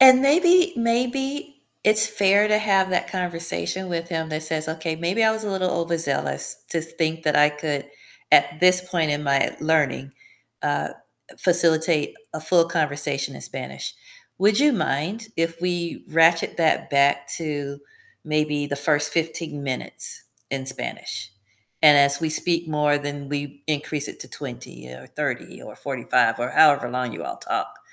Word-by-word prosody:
And 260 Hz, 0 st, +8 dB
maybe 355 Hz, +5 st, +4 dB
maybe 270 Hz, +5 st, -2 dB, 0.2 s
it's 215 Hz, +1 st, +6 dB
fair 205 Hz, -1 st, +3 dB
to 210 Hz, 0 st, +3 dB
have 195 Hz, -3 st, +1 dB
that 180 Hz, -, -1 dB
conversation 175 Hz, -, -3 dB
with 170 Hz, -1 st, -4 dB
him 160 Hz, -2 st, -3 dB
that 155 Hz, +1 st, -3 dB
says, 155 Hz, 0 st, -1 dB
"Okay, 160 Hz, 0 st, -4 dB
maybe 175 Hz, +7 st, 0 dB
I 220 Hz, -, +4 dB
was 220 Hz, 0 st, -4 dB
a 205 Hz, -, -3 dB
little 185 Hz, -2 st, -1 dB
overzealous 145 Hz, -, -1 dB
to 165 Hz, -, 0 dB
think 160 Hz, 0 st, -2 dB
that 150 Hz, -, +2 dB
I 150 Hz, 0 st, +6 dB
could 150 Hz, -1 st, -4 dB, 0.4 s
at 145 Hz, -, +4 dB
this 180 Hz, 0 st, +7 dB
point 175 Hz, -4 st, -1 dB
in 145 Hz, 0 st, -1 dB
my 140 Hz, -1 st, +1 dB
learning, 150 Hz, -4 st, 0 dB, 0.5 s
uh, 75 Hz, +1 st, -1 dB, 0.5 s
facilitate 165 Hz, -3 st, +3 dB, 0.2 s
a 155 Hz, -, -5 dB
full 170 Hz, +2 st, +4 dB
conversation 145 Hz, -4 st, -1 dB
in -, -, -10 dB
Spanish. -, -, -6 dB, 0.4 s
Would 205 Hz, +2 st, +3 dB
you 295 Hz, +1 st, +4 dB
mind 185 Hz, -, -2 dB
if 165 Hz, 0 st, -2 dB
we 175 Hz, -1 st, -3 dB
ratchet 165 Hz, +1 st, +3 dB
that 165 Hz, -2 st, +1 dB
back 140 Hz, 0 st, +2 dB
to 145 Hz, -3 st, -5 dB, 0.4 s
maybe 150 Hz, -2 st, -1 dB
the 145 Hz, -1 st, -4 dB
first 145 Hz, 0 st, +3 dB
15 160 Hz, -3 st, -2 dB
minutes 130 Hz, -2 st, -4 dB, 0.3 s
in 135 Hz, -1 st, -4 dB
Spanish, 130 Hz, -5 st, -3 dB, 0.5 s
and 150 Hz, -2 st, +8 dB
as 140 Hz, +1 st, +4 dB
we 160 Hz, -, -1 dB
speak 170 Hz, +1 st, +1 dB
more, 150 Hz, -1 st, +1 dB
then 145 Hz, -1 st, -6 dB
we 145 Hz, 0 st, -5 dB
increase 150 Hz, -1 st, -1 dB
it -, -, -10 dB
to -, -, -5 dB
20 -, -, -9 dB
or 65 Hz, +1 st, -12 dB
30 -, -, -5 dB
or -, -, -11 dB
45, -, -, 0 dB
or 120 Hz, +1 st, -2 dB
however 145 Hz, -5 st, +4 dB
long 125 Hz, -2 st, -3 dB
you -, -, -7 dB
all -, -, -6 dB
talk, -, -, -4 dB
160 Hz, 160 wpm, -23 LUFS, 145-180 Hz, 0.5 s, And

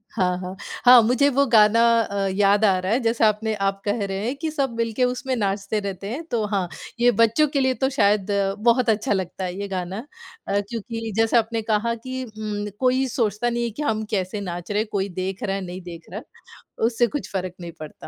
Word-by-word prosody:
हाँ, 180 Hz, -4 st, 0 dB
हाँ, 185 Hz, +1 st, -6 dB, 0.3 s
हाँ 245 Hz, 0 st, +9 dB
मुझे 255 Hz, +5 st, +3 dB
वो 280 Hz, +1 st, +3 dB
गाना 225 Hz, 0 st, +5 dB, 0.2 s
अ, 200 Hz, -3 st, -1 dB
याद 205 Hz, +2 st, +3 dB
आ 190 Hz, -3 st, +4 dB
रहा 185 Hz, +3 st, -2 dB
है। 245 Hz, -, +2 dB
जैसा 230 Hz, -2 st, +3 dB
आपने 215 Hz, +1 st, -1 dB
आप 195 Hz, -1 st, -1 dB
कह 205 Hz, +1 st, 0 dB
रहे 195 Hz, +1 st, -3 dB
हैं 250 Hz, -, -1 dB
कि 320 Hz, +2 st, -3 dB
सब 275 Hz, -5 st, -1 dB
मिलके 230 Hz, +2 st, 0 dB
उसमें 250 Hz, +1 st, -1 dB
नाचते 200 Hz, 0 st, -1 dB
रहते 200 Hz, -1 st, -5 dB
हैं 280 Hz, +7 st, -4 dB
तो 225 Hz, -3 st, 0 dB
हाँ, 195 Hz, -4 st, -1 dB, 0.3 s
ये 245 Hz, 0 st, +6 dB
बच्चों 230 Hz, +7 st, +4 dB
के 280 Hz, -1 st, 0 dB
लिए 260 Hz, -1 st, +2 dB
तो 265 Hz, -, +4 dB
शायद 205 Hz, -2 st, +3 dB, 0.3 s
बहुत 235 Hz, +2 st, +3 dB
अच्छा 210 Hz, -1 st, 0 dB
लगता 190 Hz, -1 st, -2 dB
है 180 Hz, -1 st, -3 dB
ये 200 Hz, -, -4 dB
गाना। 190 Hz, +6 st, -4 dB, 0.4 s
अ, 200 Hz, -, +2 dB
क्योंकि 225 Hz, -1 st, -5 dB
जैसा 225 Hz, +1 st, +4 dB
आपने 225 Hz, 0 st, -1 dB
कहा 220 Hz, +2 st, 0 dB
कि 255 Hz, +3 st, -6 dB
उम, 215 Hz, -2 st, -5 dB
कोई 260 Hz, +1 st, +2 dB
सोचता 230 Hz, -1 st, 0 dB
नहीं 235 Hz, 0 st, -1 dB
है 235 Hz, -, -2 dB
कि -, -, -1 dB
हम 220 Hz, -6 st, 0 dB
कैसे 195 Hz, 0 st, -2 dB
नाच 175 Hz, -1 st, -6 dB
रहे 205 Hz, -, +1 dB
हैं, 220 Hz, -, -2 dB
कोई 195 Hz, -1 st, 0 dB
देख 190 Hz, +1 st, -4 dB
रहा, 195 Hz, -1 st, -1 dB
नहीं 180 Hz, 0 st, -7 dB
देख 170 Hz, -2 st, -9 dB
रहा, 210 Hz, -, -4 dB, 0.7 s
उससे 240 Hz, +1 st, +2 dB
कुछ 290 Hz, -, -3 dB
फ़र्क 185 Hz, -2 st, -3 dB
नहीं 170 Hz, -1 st, -6 dB
पड़ता। 155 Hz, -1 st, -10 dB
215 Hz, 220 wpm, -23 LUFS, 195-235 Hz, 0.7 s, हाँ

